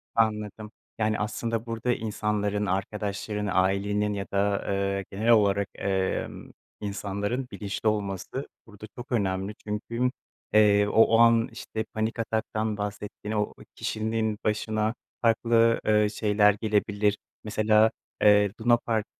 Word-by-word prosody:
Anladım, 105 -1 0 0.3
yani, 110 0 +1
aslında 115 +2 -2
burada 115 +1 -1
insanların, 105 -2 -1
arkadaşların, 105 +2 -2
ailenin 100 +3 +1
ya 100 -1 -3
da, 100 0 +1
ııı, 100 0 0
genel 110 +4 -1
olarak, 100 -3 +4
emm, 95 -1 -2 0.3
insanların 105 +5 -3
bilinçli 100 +1 -2
olması 100 +5 -3 0.2
burada 105 -1 -11
çok 125 +2 -9
önemli 95 -2 -1
çünkü, 115 +4 -1 0.4
eee, 105 -1 +5
o 115 +1 +5
an 115 -1 +5
işte 110 -2 -5
panik 110 +2 -2
ataktan 110 -1 -1
bahsettiğini, 105 +1 -5
o - - +3 0.2
o - - -13
kişinin 110 -1 -1
başına 110 0 0 0.3
farklı, 115 0 +3
ııı, 105 -1 +4
şeyler 105 -1 +3
gelebilir. 105 -1 +1 0.3
Mesela, 110 +1 +3 0.3
eee, 105 -1 +5
lunapark, 115 -2 +2
105 Hz, 120 wpm, -27 LUFS, 100-110 Hz, 0.4 s, eee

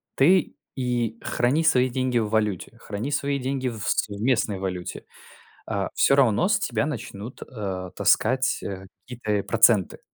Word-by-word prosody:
ты 175 +4 +3 0.2
и 120 -3 -1
храни 135 +7 +1
свои 130 -5 +4
деньги 130 -1 -1
в 110 -2 0
валюте, 105 0 -1
храни 105 +7 -5
свои 140 0 -1
деньги 130 0 -2
в 110 -2 -8
с - - +1
местной 105 -1 0
валюте, 90 -2 -5 0.7
э, - - -1
всё 140 - +4
равно 125 -7 +3
с - - +3
тебя - - -1
начнут, 105 +6 -7
э, 95 -6 -5
таскать, 125 +5 +2
э, 95 -1 -6 0.2
какие-то 120 -3 -5
и - - -2
проценты, 105 -7 +3
115 Hz, 155 wpm, -24 LUFS, 100-130 Hz, 0.7 s, свои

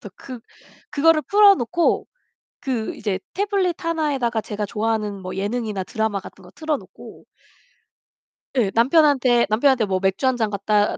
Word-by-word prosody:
그래서 - - -11
그 255 -3 -9 0.5
그거를 310 +1 +3
풀어놓고 355 - +3 0.5
그 245 -5 -3
이제 200 -3 -3
태블릿 385 -4 -1
하나에다가 285 -9 -1
제가 210 -1 -5
좋아하는 210 -2 -2
뭐 185 0 -6
예능이나 205 -1 -3
드라마 220 +1 -2
같은 190 - -13
거 180 - -15
틀어놓고 310 -2 -6 1.3
예 225 -7 +1
남편한테 260 -1 +4
남편한테 245 +2 +3
뭐 190 -2 -1
맥주 190 +6 0
한 260 - +2
잔 220 -2 0
갖다 205 +1 +1
235 Hz, 325 characters per minute, -22 LUFS, 210-300 Hz, 1.3 s, 남편한테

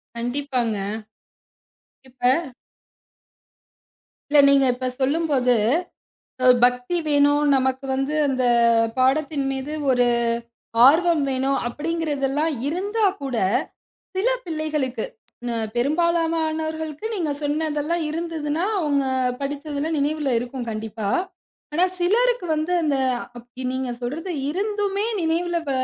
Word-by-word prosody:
கண்டிப்பாங்க. 245 -2 -1 1.3
இப்ப 250 0 -29 2.1
இல்ல 295 - +6
நீங்க 275 -1 +5
இப்ப 255 +1 -3
சொல்லும்போது, 275 -3 +2 0.9
அ, - - +2 0.2
பக்தி 250 +7 +1
வேணும். 290 0 +3
நமக்கு 265 0 +1
வந்து 270 +3 -1
அந்தப் 235 -3 +3
பாடத்தின் 275 +2 +1
மீது 270 +3 -4 0.2
ஒரு 245 -1 +3 0.8
ஆர்வம் 330 +2 +4
வேணும் 265 +1 0
அப்படிங்கிறது 300 0 -2
எல்லாம் 300 +4 0 0.2
இருந்தாக்கூட 380 - -1 0.8
சில 395 +6 +2 0.2
பிள்ளைகளுக்கு, 300 -7 -2 0.4
ம், 230 -2 -1
பெரும்பாலானவர்களுக்கு 320 - 0
நீங்கச் 305 -6 -2
சொன்னதெல்லாம் 305 +2 -1
இருந்ததுன்னா 320 0 -2 0.2
அவங்க 285 -3 +1 0.4
படிச்சது 285 +1 -4
எல்லாம் 315 +1 -1
நினைவுல 290 -1 0
இருக்கும் 245 -1 -5
கண்டிப்பா. 215 -1 -4 0.6
ஆனா 345 +4 +3 0.2
சிலருக்கு 465 +2 +2
வந்து 310 +3 -1
அந்த 290 -3 +1 0.4
அப் 240 0 -12 0.2
நீங்கச் 255 -2 -3
சொல்றது 320 +9 -3 0.2
இருந்துமே 410 +2 -1 0.2
நினைவுல 340 +2 0
வ - - 0
290 Hz, 100 wpm, -23 LUFS, 260-325 Hz, 2.1 s, இல்ல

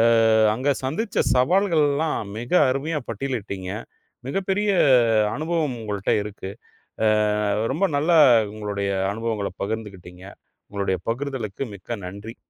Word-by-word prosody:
அ-அங்க 115 +2 +4
சந்திச்ச 160 - -1
சவால்கள்லாம் 150 - +1
மிக 120 +2 -7 0.2
அருமையா 145 +4 -1
பட்டியலிட்டீங்க. 105 -6 -4 0.6
மிகப் 190 +7 -3
பெரிய 205 +2 +1 0.6
அனுபவம் 155 -4 -1
உங்கள்ட்ட 105 -3 -3
இருக்கு. 100 -2 -7 0.6
அ, - - +5 0.7
ரொம்ப 175 +7 +1
நல்லா 165 +4 +3 0.4
உங்களுடைய 100 -2 -3 0.2
அனுபவங்கள 110 -2 -3
பகிர்ந்துக்கிட்டீங்க. 95 -4 -6 0.4
உங்களுடைய 100 -3 -2
பகிர்தலுக்கு 130 -2 -3
மிக்க 115 +4 -6
நன்றி! 100 +5 -9
115 Hz, 100 wpm, -23 LUFS, 100-145 Hz, 0.7 s, அ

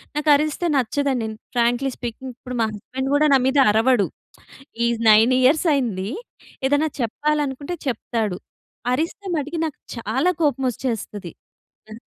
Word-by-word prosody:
నాకరిస్తే 300 +2 +2
నచ్చదండి. 260 -2 0 0.3
Frankly 240 +3 +2
speaking 250 +2 -6
ఇప్పుడు 250 -1 -7
మా - - +3
హస్బండ్ 260 +6 -5
కూడా 300 +1 +4
నా 270 - +7
మీద 265 +2 +1
అరవడు. 225 -1 +3 0.8
ఈ - - +3 0.2
9 220 +4 +6
ఇయర్స్ 290 +7 +4
అయింది. 215 -8 -1 0.6
ఏదైనా 290 +3 +2
చెప్పాలనుకుంటే 290 +5 -1
చెప్తాడు. 220 -5 -2 0.6
అరిస్తే 330 +8 -2
మటికి 300 +3 -3
నాకు 310 - -6 0.2
చాలా 250 - 0
కోపం 275 -3 +1
వచ్చేస్తది. 210 -7 -4 0.6
అ! 215 - -9
260 Hz, 125 wpm, -22 LUFS, 230-290 Hz, 0.8 s, నా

